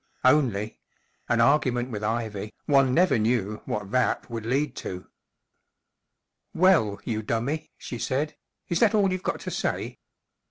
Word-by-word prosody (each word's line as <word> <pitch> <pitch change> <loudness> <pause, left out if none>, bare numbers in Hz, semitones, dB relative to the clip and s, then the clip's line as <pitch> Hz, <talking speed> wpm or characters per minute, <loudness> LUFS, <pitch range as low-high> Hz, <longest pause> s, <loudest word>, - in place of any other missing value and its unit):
Only—an 120 -2 0
argument 125 -2 +2
with 105 -2 -4
Ivy* 110 -2 -2
one 135 -3 +4
never 175 -3 +3
knew' 110 -2 0
what 105 -2 -4
that 125 -1 0
would 115 -1 -4
lead 135 +1 0
to* 90 -1 -6 0.7
" - - -56
Well, 110 - +4
you 110 -2 -2
dummy/' 120 +8 -2
she 120 - -7
said, 145 +6 -1
u - - -32 0.3
is 170 - +1
that 230 -1 +4
all 200 -3 +3
you've 185 0 -2
got - - -3
to - - -5
say - - -3
120 Hz, 150 wpm, -26 LUFS, 110-150 Hz, 0.7 s, one